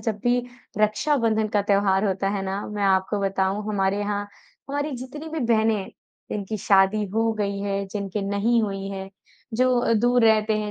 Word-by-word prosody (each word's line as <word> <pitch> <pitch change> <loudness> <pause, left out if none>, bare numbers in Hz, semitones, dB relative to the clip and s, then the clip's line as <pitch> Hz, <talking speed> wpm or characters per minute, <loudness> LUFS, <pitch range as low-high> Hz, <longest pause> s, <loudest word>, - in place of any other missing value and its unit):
जब 220 -3 -2
भी 245 0 +3 0.4
रक्षाबंधन 220 0 +2
का 205 -1 +1
त्योहार 200 -1 +2
होता 195 0 0
है 200 -1 -2
ना। 195 +1 -2
मैं 210 -1 -4
आपको 195 +1 +2
बताऊँ 195 +1 0
हमारे 195 -1 0
यहाँ 205 0 -1 0.5
हमारी 290 +2 -2
जितनी 295 +6 -8
भी 315 -1 -4
बहनें 220 -1 +3
हैं 195 - -6 0.4
जिनकी 210 +1 -3
शादी 195 +2 +3
हो 225 0 +2
गई 200 -2 -2
है, 200 0 -2
जिनके 200 0 -4
नहीं 225 +4 +2
हुई 195 -2 -3
है। 195 -1 -6 0.5
जो 255 +1 +3
अ, 230 - +1
दूर 240 +2 +3
रहते 215 -1 +3
हैं 210 0 -3
210 Hz, 180 wpm, -24 LUFS, 195-225 Hz, 0.5 s, भी